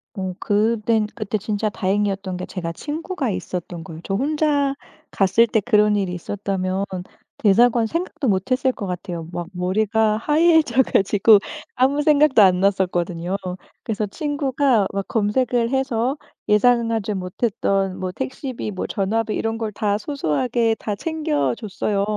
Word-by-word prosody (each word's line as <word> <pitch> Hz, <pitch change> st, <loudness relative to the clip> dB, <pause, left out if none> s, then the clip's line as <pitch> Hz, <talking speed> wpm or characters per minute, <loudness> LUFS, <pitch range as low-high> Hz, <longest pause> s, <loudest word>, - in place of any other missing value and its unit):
어 190 Hz, -2 st, -3 dB
그땐 215 Hz, +1 st, +1 dB
그때 215 Hz, -1 st, -2 dB
진짜 210 Hz, 0 st, -2 dB
다행이었던 195 Hz, -1 st, -1 dB
게 180 Hz, 0 st, -5 dB
제가 170 Hz, -3 st, -5 dB
친구가 305 Hz, -, -4 dB
있었던 180 Hz, -3 st, -5 dB
거예요. 160 Hz, +1 st, -9 dB
저 195 Hz, -, -3 dB
혼자 285 Hz, +1 st, +1 dB, 0.3 s
갔을 200 Hz, +4 st, +3 dB
때 220 Hz, -1 st, +1 dB
그런 210 Hz, -2 st, +3 dB
일이 190 Hz, -3 st, -1 dB
있었다면 190 Hz, +1 st, -2 dB, 0.5 s
대사관 230 Hz, +2 st, +4 dB
생각도 335 Hz, -3 st, -3 dB
못했을 255 Hz, +7 st, +1 dB
것 200 Hz, -, -6 dB
같아요. 175 Hz, -2 st, -5 dB
막 175 Hz, -1 st, -5 dB
머리가 215 Hz, +4 st, +1 dB
하얘져 300 Hz, -2 st, +3 dB
가지고 205 Hz, +1 st, +4 dB, 0.4 s
아무 270 Hz, +3 st, +2 dB
생각도 295 Hz, -5 st, +5 dB
안 185 Hz, -2 st, +5 dB
났었거든요. 180 Hz, -2 st, 0 dB, 0.5 s
그래서 215 Hz, -2 st, -1 dB
친구가 270 Hz, -3 st, 0 dB
막 195 Hz, -1 st, -3 dB
검색을 230 Hz, +2 st, +1 dB
해서 265 Hz, 0 st, 0 dB, 0.3 s
예상하지 230 Hz, -1 st, +2 dB
못했던 195 Hz, 0 st, -1 dB
뭐 185 Hz, -1 st, -3 dB
택시비 260 Hz, 0 st, -5 dB
뭐 185 Hz, -, -4 dB
전화비 215 Hz, +2 st, -1 dB
이런 225 Hz, 0 st, -2 dB
걸 220 Hz, -2 st, -3 dB
다 205 Hz, 0 st, 0 dB
소소하게 230 Hz, -, 0 dB
다 210 Hz, -, -3 dB
챙겨 310 Hz, +1 st, -1 dB
줬어요. 205 Hz, -1 st, -2 dB
215 Hz, 305 characters per minute, -21 LUFS, 195-255 Hz, 0.5 s, 생각도